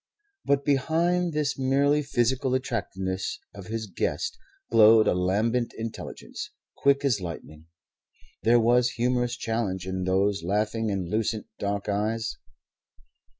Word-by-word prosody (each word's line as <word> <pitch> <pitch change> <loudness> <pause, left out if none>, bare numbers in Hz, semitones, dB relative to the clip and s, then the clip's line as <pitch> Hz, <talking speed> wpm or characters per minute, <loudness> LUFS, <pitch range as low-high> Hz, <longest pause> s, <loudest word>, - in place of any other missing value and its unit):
But 140 -1 +2
behind 165 +5 +1
this 150 -3 -1
merely 140 +3 +3
physical 130 -1 +1
attractiveness 95 -7 -3 0.2
of 100 -2 -10
his 110 0 -3
guest 95 - -2 0.4
glowed 110 -1 +7
a - - +4
lambent 105 +7 0
intelligence, 115 0 -6 0.3
quick 140 0 +2
as 115 -8 +2
lightning. 80 -2 -8 0.7
There 120 +1 +5
was 120 +1 +4
humorous 125 0 0
challenge 110 -6 -2
in 95 -1 -3
those 95 +1 +1
laughing 105 +5 0
and 95 -3 -2
lucent 110 +2 -1
dark 100 0 -2
eyes. 110 +2 -1
115 Hz, 120 wpm, -26 LUFS, 100-130 Hz, 0.7 s, glowed